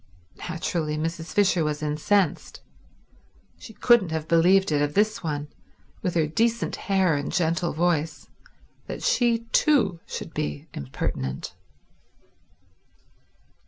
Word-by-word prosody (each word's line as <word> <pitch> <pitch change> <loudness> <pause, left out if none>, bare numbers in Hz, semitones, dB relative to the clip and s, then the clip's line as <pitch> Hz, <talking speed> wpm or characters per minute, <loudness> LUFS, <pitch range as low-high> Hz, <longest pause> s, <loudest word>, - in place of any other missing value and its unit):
Naturally, 165 -3 -2
Mrs. 165 +1 -4
Fisher 195 -5 +3
was 150 0 -2
incensed. 155 +5 0 1.0
She - - -11
couldn't 225 -4 +4
have 160 -1 -3
believed 180 +3 +4
it 145 -1 +2
of 145 0 -1
this 215 +2 +2
one, 150 -3 -3 0.5
with 180 -2 -2
her 160 -2 +3
decent 230 +9 0
hair 190 -4 +1
and 145 0 -3
gentle 170 0 0
voice, 160 -2 -1 0.6
that - - -6
she 235 -2 +2
too 225 - +3
should 160 - -6
be 150 -1 -3
impertinent. 65 -1 -4
165 Hz, 115 wpm, -25 LUFS, 150-195 Hz, 1.0 s, couldn't